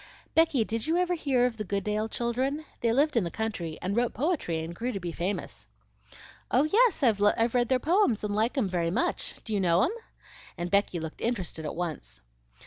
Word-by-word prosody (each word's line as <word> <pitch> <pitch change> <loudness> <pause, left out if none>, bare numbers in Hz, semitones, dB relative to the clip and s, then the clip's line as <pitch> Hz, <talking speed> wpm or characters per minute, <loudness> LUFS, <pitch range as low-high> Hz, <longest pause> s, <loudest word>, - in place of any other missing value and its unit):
"Becky, 320 -7 +4
did 225 +3 -2
you 330 +2 +2
ever 360 0 +1
hear 275 -7 +2
of 240 -2 -1
the 215 - -3
Goodale 210 +2 -1
children? 260 +7 -1
They 230 - +1
lived 285 +5 +2
in 230 - +3
the 170 - -2
country 175 -7 -4
and 190 +2 -1
wrote 240 0 +1
poetry 260 - -1
and 165 +1 -6
grew 240 +8 -3
to 200 - -4
be 175 -2 -4
famous." 180 +5 -4 0.8
"Oh 260 - +4
yes, 425 - +3
I've 225 -5 +4 0.3
read 245 -2 +2
their 260 - +4
poems 310 - +2
and 210 -1 -1
like 225 +6 0
'em 240 -7 +2
very 175 -2 0
much. 345 - -1
Do 220 - -4
you 205 - +1
know 175 0 +3
'em?" 260 - +2 0.7
and 175 0 -4
Becky 200 -3 +2
looked 160 -1 -7
interested 185 -9 -2
at - - -4
once. 175 -3 -4
225 Hz, 205 wpm, -28 LUFS, 185-265 Hz, 0.8 s, Becky